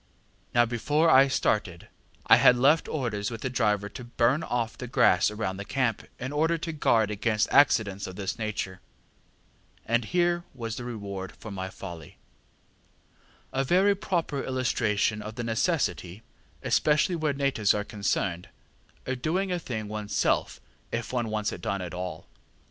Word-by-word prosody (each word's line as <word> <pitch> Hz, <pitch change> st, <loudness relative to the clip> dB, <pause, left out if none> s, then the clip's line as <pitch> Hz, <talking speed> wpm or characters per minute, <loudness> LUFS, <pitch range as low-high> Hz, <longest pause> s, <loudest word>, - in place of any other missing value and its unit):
ŌĆ£Now 120 Hz, -1 st, +5 dB
before 145 Hz, +8 st, +2 dB
I 135 Hz, 0 st, +7 dB
started, 105 Hz, -9 st, -1 dB, 0.4 s
I -, -, +7 dB
had 125 Hz, -, +6 dB
left 145 Hz, +6 st, +4 dB
orders 115 Hz, -8 st, -2 dB
with 115 Hz, -2 st, -7 dB
the 130 Hz, -, -3 dB
driver 105 Hz, -4 st, +1 dB
to 125 Hz, -, -9 dB
burn 120 Hz, +4 st, +1 dB
off 120 Hz, -5 st, -2 dB
the 125 Hz, -, -7 dB
grass 120 Hz, -7 st, +4 dB
round 105 Hz, -3 st, -4 dB
the -, -, -4 dB
camp, 115 Hz, 0 st, -1 dB
in 130 Hz, +2 st, -5 dB
order 160 Hz, +3 st, +1 dB
to 165 Hz, 0 st, -4 dB
guard 115 Hz, -8 st, +2 dB
against 110 Hz, +1 st, 0 dB
accidents 105 Hz, -8 st, +3 dB
of 95 Hz, -, -8 dB
this 100 Hz, +2 st, -4 dB
nature, 100 Hz, -4 st, -4 dB, 1.0 s
and 115 Hz, 0 st, +1 dB
here 175 Hz, +3 st, +1 dB
was 115 Hz, -3 st, -4 dB
the 120 Hz, -, -6 dB
reward 100 Hz, -5 st, -6 dB
of 110 Hz, -, -8 dB
my 95 Hz, -1 st, -4 dB
folly: 85 Hz, -5 st, -10 dB, 1.4 s
a 135 Hz, -, +1 dB
very 185 Hz, +8 st, +4 dB
proper 170 Hz, -7 st, -2 dB
illustration 115 Hz, -5 st, 0 dB
of 110 Hz, +1 st, -7 dB
the 120 Hz, -, -4 dB
necessity, 110 Hz, -, -1 dB, 0.4 s
especially 150 Hz, +4 st, +2 dB
where 155 Hz, -2 st, 0 dB
natives 135 Hz, -8 st, +1 dB
are 105 Hz, -, -1 dB
concerned, 95 Hz, -4 st, -2 dB, 0.6 s
of 130 Hz, -1 st, -3 dB
doing 185 Hz, +6 st, 0 dB
a 180 Hz, -, 0 dB
thing 110 Hz, -9 st, -5 dB
oneŌĆÖs 105 Hz, 0 st, -5 dB
self -, -, 0 dB, 0.3 s
if 115 Hz, +2 st, -4 dB
one 120 Hz, -3 st, -1 dB
wants 105 Hz, -1 st, -1 dB
it -, -, -7 dB
done 100 Hz, -1 st, -2 dB
at 90 Hz, -1 st, -7 dB
all. 90 Hz, 0 st, -5 dB
115 Hz, 160 wpm, -27 LUFS, 105-135 Hz, 1.4 s, I